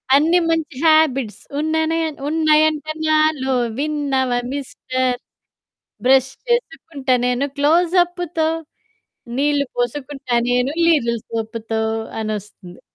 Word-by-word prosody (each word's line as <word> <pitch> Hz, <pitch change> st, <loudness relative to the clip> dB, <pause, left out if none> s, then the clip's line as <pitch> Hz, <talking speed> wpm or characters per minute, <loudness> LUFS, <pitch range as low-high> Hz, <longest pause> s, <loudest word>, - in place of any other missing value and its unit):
అన్ని 325 Hz, +5 st, +4 dB
మంచి 325 Hz, -4 st, -1 dB
హాబిట్స్ 305 Hz, -8 st, +3 dB, 0.2 s
ఉన్ననే 320 Hz, +1 st, 0 dB, 0.3 s
ఉన్నయంటే 310 Hz, 0 st, +2 dB, 0.2 s
నాలో 310 Hz, -4 st, +2 dB, 0.2 s
విన్నావా 275 Hz, -4 st, 0 dB
మిస్టర్. 255 Hz, -2 st, -2 dB, 0.9 s
బ్రష్ 260 Hz, 0 st, +4 dB, 0.2 s
చేసుకుంటా 320 Hz, -, -1 dB
నేను 250 Hz, +3 st, +1 dB
క్లోజప్పుతో, 345 Hz, +2 st, +2 dB, 0.9 s
నీళ్ళు 285 Hz, +1 st, +1 dB
పోసుకుంటా 260 Hz, +1 st, -3 dB, 0.2 s
నేను 250 Hz, +2 st, +2 dB
లీరిల్ 235 Hz, -9 st, +2 dB
సొపుతో 225 Hz, 0 st, -3 dB, 0.4 s
అనొస్తుంది. 205 Hz, -4 st, -6 dB
285 Hz, 85 wpm, -20 LUFS, 250-315 Hz, 0.9 s, అన్ని